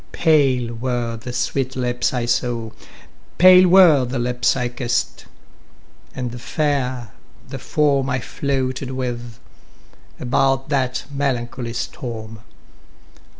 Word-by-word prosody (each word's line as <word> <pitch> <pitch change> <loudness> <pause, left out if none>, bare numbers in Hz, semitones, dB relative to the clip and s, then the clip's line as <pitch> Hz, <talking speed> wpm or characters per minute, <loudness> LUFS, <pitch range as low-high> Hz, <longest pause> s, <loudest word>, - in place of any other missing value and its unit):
Pale 135 -7 +2
were 120 -1 -2
the 115 +2 -7
sweet 130 +2 -2
lips 125 -1 -1
I 125 -2 -2
saw, 120 -2 -1 0.7
Pale 185 0 +8
were 170 -7 +7
the 125 +2 -3
lips 120 -1 +1
I 125 -1 -1
kiss'd, 120 -1 -2 0.9
and 125 -2 -5
fair 130 -5 -2 0.4
the 135 0 -6
form 140 -1 +1
I 130 -1 0
floated 130 -1 -3
with, 120 -3 -4 0.8
about 135 +2 +1
that 130 -3 -1
melancholy 125 -3 -2
storm. 115 -2 -6
125 Hz, 110 wpm, -20 LUFS, 120-135 Hz, 0.9 s, Pale